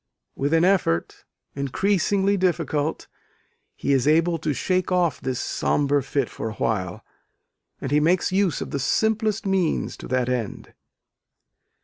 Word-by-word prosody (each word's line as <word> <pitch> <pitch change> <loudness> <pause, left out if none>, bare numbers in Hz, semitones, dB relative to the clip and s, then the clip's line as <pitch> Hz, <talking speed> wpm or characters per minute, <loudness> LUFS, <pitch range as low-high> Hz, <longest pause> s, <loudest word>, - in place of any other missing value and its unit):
With 140 +2 -1
an 165 +2 +4
effort 180 - 0 0.3
increasingly 195 +7 +1
difficult 165 -5 -1 0.7
he 140 - 0
is 135 0 +2
able 165 +2 +3
to 155 0 -1
shake 185 +6 -1
off 175 -6 +1
this 130 -1 -2
sombre 145 0 +1
fit 135 -1 -1
for 110 - -5
awhile; 105 -4 -2 0.7
and 135 - -4
he 150 - +4
makes 170 +5 +2
use 190 -5 +1
of - - -5
the 140 - -2
simplest 220 - 0
means 190 -4 0
to - - -9
that 125 -1 0
end. 125 -4 -3
155 Hz, 135 wpm, -24 LUFS, 135-185 Hz, 0.7 s, an